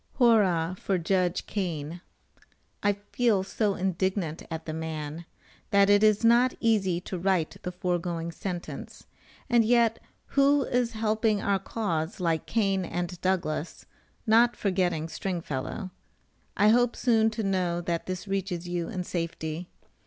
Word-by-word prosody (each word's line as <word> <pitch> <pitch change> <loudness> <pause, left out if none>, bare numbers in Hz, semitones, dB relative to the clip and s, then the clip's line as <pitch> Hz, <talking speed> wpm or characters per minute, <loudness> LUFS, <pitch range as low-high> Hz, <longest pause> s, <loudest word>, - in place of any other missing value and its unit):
"Whorra 185 -8 +4
for 195 - 0
Judge 180 +1 0
Kane." 170 -4 -4 0.8
I 205 - +3 0.2
feel 225 -6 +3
so 200 +1 0
indignant 185 -3 -1
at 160 0 -5
the 155 - -4
man, 160 0 -5 0.4
that 200 -1 +5
it 205 0 +5
is 215 +1 +4
not 240 +2 +5
easy 195 -7 +2
to 180 0 -5
write 180 -3 0
the 180 - -4
foregoing 175 -2 -2
sentence, 175 0 -6 0.4
and 240 -2 +4
yet 230 0 +3 0.3
who 280 0 +4
is 245 -2 0
helping 220 -1 +1
our 200 -1 +1
cause 185 -4 -3
like 165 -3 0
Kane 195 -4 +1
and 175 0 -4
Douglas, 175 -4 -2 0.4
not 235 +2 +5
forgetting 180 -5 0
Stringfellow. 175 +1 -4 0.7
I 210 - +5
hope 245 +1 +3
soon 225 -3 +3
to 220 0 -4
know 185 -3 0
that 170 -1 -3
this 185 +2 -4
reaches 190 -3 -2
you 175 -1 -2
in 185 -5 -3
safety. 165 -1 -4
190 Hz, 140 wpm, -27 LUFS, 170-215 Hz, 0.8 s, that